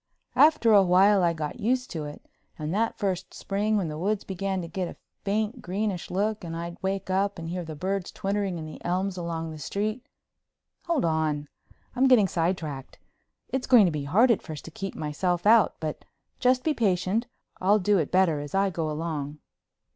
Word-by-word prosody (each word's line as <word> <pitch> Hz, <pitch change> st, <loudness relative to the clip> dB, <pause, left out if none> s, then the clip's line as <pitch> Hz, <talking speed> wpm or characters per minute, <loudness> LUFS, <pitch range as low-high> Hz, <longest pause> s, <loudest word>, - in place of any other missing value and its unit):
After 295 Hz, -7 st, +5 dB
a 200 Hz, -, +8 dB
while 190 Hz, +2 st, +5 dB
I 170 Hz, -1 st, +3 dB
got 155 Hz, +5 st, -5 dB
used 250 Hz, +4 st, 0 dB
to 160 Hz, -4 st, -4 dB
it 145 Hz, -, -10 dB, 0.3 s
and 155 Hz, +1 st, -3 dB
that 225 Hz, +3 st, 0 dB
first 190 Hz, -2 st, -2 dB
spring 210 Hz, +2 st, 0 dB
when 190 Hz, -5 st, 0 dB
the 150 Hz, 0 st, -5 dB
woods 205 Hz, +3 st, 0 dB
began 190 Hz, 0 st, -2 dB
to -, -, -6 dB
get 180 Hz, +2 st, -3 dB
a -, -, -8 dB, 0.3 s
faint 215 Hz, +4 st, -1 dB
greenish 195 Hz, -1 st, -2 dB
look 210 Hz, +3 st, -1 dB
and 165 Hz, -1 st, -5 dB
I'd 170 Hz, +1 st, -6 dB
wake 190 Hz, 0 st, -2 dB
up 200 Hz, +2 st, +1 dB
and 165 Hz, -1 st, -6 dB
hear 180 Hz, +1 st, -3 dB
birds 180 Hz, +4 st, -3 dB
twittering 195 Hz, -2 st, -2 dB
in 160 Hz, -, -6 dB
the 155 Hz, -, -10 dB
elms 185 Hz, +2 st, -1 dB
along 165 Hz, -2 st, -4 dB
the 155 Hz, -, -8 dB
street—hold 215 Hz, -, -5 dB
on! 155 Hz, -3 st, 0 dB, 0.5 s
I'm 260 Hz, +1 st, +4 dB
getting 240 Hz, -7 st, +6 dB
sidetracked. 165 Hz, -6 st, -2 dB, 0.5 s
It's 265 Hz, -1 st, -2 dB
going 245 Hz, -6 st, +7 dB
to 175 Hz, -, +2 dB
be 150 Hz, -2 st, -3 dB
hard 220 Hz, -, +4 dB
at 225 Hz, -, +2 dB
first 155 Hz, -2 st, -8 dB
to 165 Hz, -, -9 dB
keep 195 Hz, +4 st, -6 dB
myself 175 Hz, +4 st, -1 dB
out, 220 Hz, 0 st, +5 dB
but 155 Hz, -1 st, -4 dB, 0.4 s
just 255 Hz, 0 st, +3 dB
be 315 Hz, -, +2 dB
patient, 205 Hz, 0 st, +1 dB, 0.3 s
I'll 200 Hz, +3 st, +4 dB
do 205 Hz, 0 st, +2 dB
it 155 Hz, -, -1 dB
better 180 Hz, -5 st, +3 dB
as 145 Hz, +4 st, -6 dB
I 195 Hz, 0 st, +2 dB
go 165 Hz, -3 st, -2 dB
along. 150 Hz, -2 st, -3 dB
185 Hz, 190 wpm, -27 LUFS, 165-210 Hz, 0.5 s, a